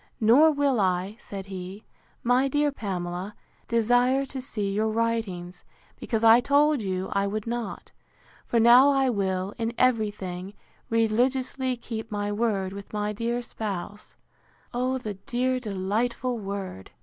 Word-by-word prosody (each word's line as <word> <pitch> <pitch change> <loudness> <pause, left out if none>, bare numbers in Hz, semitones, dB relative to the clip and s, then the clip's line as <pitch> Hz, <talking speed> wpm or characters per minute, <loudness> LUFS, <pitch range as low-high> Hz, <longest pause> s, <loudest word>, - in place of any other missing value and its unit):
Nor 260 +8 +6
will 285 -4 +1
I, 185 +1 0
said 195 -1 -7
he, 190 +2 -8 0.4
my 250 +3 +3
dear 290 +2 +1
Pamela, 185 -4 -4 0.3
desire 245 +4 +3
to 265 0 -6
see 210 -6 -3
your 215 +2 +1
writings, 220 -6 -2 0.4
because 225 -2 -2
I 225 +1 +8
told 285 +2 +3
you 190 -2 -2
I 200 0 +1
would 210 +1 -3
not; 235 -3 -5 0.6
for 235 - +2
now 240 +4 +7
I 270 -2 +3
will, 190 -2 -1
in 230 +1 -2
every 230 -4 +3
thing, 190 -1 -7 0.3
religiously 250 +3 +1
keep 225 -1 -6
my 205 0 -2
word 205 -3 -1
with 200 0 -9
my 210 0 -1
dear 235 +3 -2
spouse: 205 -3 -6 0.6
(O 255 +2 0
the 220 -5 -5
dear 255 +5 -1
delightful 225 +4 -1
word!) 195 - -6
225 Hz, 140 wpm, -26 LUFS, 200-245 Hz, 0.6 s, I